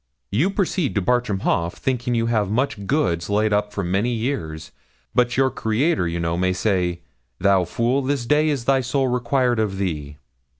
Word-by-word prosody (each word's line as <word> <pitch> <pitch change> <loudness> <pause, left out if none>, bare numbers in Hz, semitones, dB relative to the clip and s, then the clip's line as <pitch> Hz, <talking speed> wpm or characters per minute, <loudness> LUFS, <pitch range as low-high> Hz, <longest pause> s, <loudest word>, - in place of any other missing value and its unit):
You 135 - +2
proceed 190 - -1
to 100 - +2
Bartram 120 -4 +1
Haugh, 85 0 +1
thinking 125 +4 -2
you 115 0 +1
have 110 -4 +1
much 110 -3 -1
goods 95 - 0
laid 105 +1 +2
up 105 0 0
for 100 - -3
many 95 +7 0
years; 110 - -3 0.4
but 120 0 +2
your 135 0 +3
Creator, 120 - 0
you 85 +1 -3
know, 85 0 -1
may 90 +1 +1
say, 90 -3 0 0.4
"Thou 95 -1 +3
fool, 120 +9 0
this 135 -2 -1
day 150 +4 +3
is 135 -6 -2
thy 135 0 +3
soul 130 +2 0
required 125 0 +1
of 105 -3 -1
thee." 75 -7 -3
110 Hz, 180 wpm, -22 LUFS, 95-130 Hz, 0.4 s, your